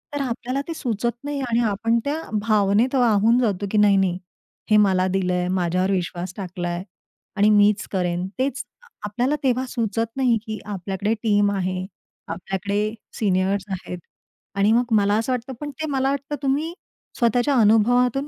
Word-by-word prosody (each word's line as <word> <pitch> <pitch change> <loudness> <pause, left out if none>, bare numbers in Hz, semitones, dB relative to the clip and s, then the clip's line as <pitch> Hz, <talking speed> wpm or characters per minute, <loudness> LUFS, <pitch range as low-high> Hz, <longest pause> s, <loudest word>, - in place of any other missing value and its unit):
तर 290 - -1
आपल्याला 255 +1 -2
ते 335 - -3
सुचत 235 -5 -1
नाही 290 0 -3
आणि 230 0 +2
आपण 225 +3 +1
त्या 300 +3 -1 0.3
भावनेत 215 +4 +3
वाहून 230 -1 +4
जातो, 205 -5 0
की 215 - +1
"नाही-नाही, 195 -3 +4 0.5
हे 215 - +7
मला 190 -3 +3
दिलंय. 180 -1 0
माझ्यावर 185 +1 0
विश्वास 180 -1 -3
टाकलाय 175 -2 -4 0.5
आणि 205 +1 +5
मीच 205 0 +4
करेन." 180 -1 -1
तेच 275 +1 -1 0.4
आपल्याला 245 +7 0
तेव्हा 260 -1 +1
सुचत 230 -2 -2
नाही 250 -4 +3
की 215 -1 -5
आपल्याकडे 200 +1 -2
टीम 205 -2 +3
आहे, 185 -1 -2 0.4
आपल्याकडे 200 +3 -2 0.3
सीनियर्स 195 -1 +1
आहेत. 180 -1 -5 0.6
आणि 200 +2 +3
मग 235 +1 +2
मला 205 0 +3
असं 225 +3 -1
वाटतं 250 +1 -4
पण 295 - -4
ते 315 +3 -5
मला 270 -1 +1
वाटतं 280 +1 -3
तुम्ही 290 +5 0 0.4
स्वतःच्या 245 +4 +2
अनुभवातून 245 +5 +3
210 Hz, 150 wpm, -23 LUFS, 195-250 Hz, 0.6 s, हे